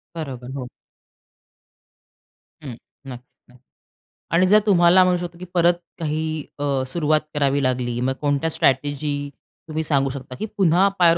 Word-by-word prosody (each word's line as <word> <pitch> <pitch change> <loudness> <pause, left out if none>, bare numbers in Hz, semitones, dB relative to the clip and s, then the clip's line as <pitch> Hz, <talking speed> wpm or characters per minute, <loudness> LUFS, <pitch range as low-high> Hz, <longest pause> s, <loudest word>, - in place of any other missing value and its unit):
बरोबर, 130 -6 -6
हो. 125 - -5 2.0
हं, 130 -5 -7 0.3
नक्की 125 -1 -13
न 125 - -19 0.8
आणि 180 +2 +4
जर 210 +2 +6
तुम्हाला, 180 -2 +5
म्हणू 180 -1 +2
शकतो, 175 -1 -7
की 180 - -7
परत 175 0 +4 0.3
काही, 155 -1 -2
अ, 140 -2 0
सुरुवात 155 +1 +1
करावी 140 -1 +1
लागली, 125 -2 -1
मग 130 +1 0
कोणत्या 145 +2 0
स्ट्रॅटेजी 145 -1 0 0.5
तुम्ही 160 0 -3
सांगू 140 -3 +1
शकता, 130 -1 -8
की 215 - -2
पुन्हा 185 +1 +4
पायावर 170 -1 +5
150 Hz, 140 wpm, -22 LUFS, 135-170 Hz, 2.0 s, जर